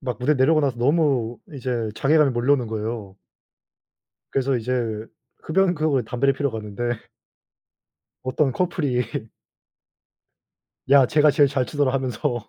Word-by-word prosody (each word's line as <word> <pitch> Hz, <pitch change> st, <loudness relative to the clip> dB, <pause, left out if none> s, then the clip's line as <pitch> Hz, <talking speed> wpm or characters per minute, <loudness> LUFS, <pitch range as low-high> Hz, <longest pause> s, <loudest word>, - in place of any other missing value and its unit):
막 125 Hz, -3 st, -4 dB
무대 150 Hz, +4 st, +2 dB
내려오고 150 Hz, +4 st, +3 dB
나서 135 Hz, -4 st, 0 dB
너무 130 Hz, -4 st, +1 dB
이제 125 Hz, -5 st, -3 dB
자괴감이 150 Hz, +2 st, +3 dB
몰려오는 125 Hz, +1 st, +1 dB
거예요. 110 Hz, -2 st, -5 dB, 1.1 s
그래서 135 Hz, -1 st, 0 dB
이제 115 Hz, -2 st, -2 dB, 0.4 s
흡연 185 Hz, +2 st, +2 dB
구역으로 150 Hz, -4 st, +1 dB
담배를 125 Hz, +5 st, +1 dB
피러 140 Hz, +1 st, -1 dB
갔는데 110 Hz, +1 st, -4 dB, 1.3 s
어떤 130 Hz, +2 st, 0 dB
커플이 145 Hz, -6 st, 0 dB, 1.9 s
"야 140 Hz, 0 st, +7 dB
쟤가 150 Hz, +2 st, +4 dB
제일 145 Hz, 0 st, +4 dB
잘 135 Hz, -2 st, 0 dB
추더라." 145 Hz, -2 st, 0 dB
하면서 130 Hz, -2 st, -2 dB
130 Hz, 290 characters per minute, -23 LUFS, 120-145 Hz, 1.9 s, 야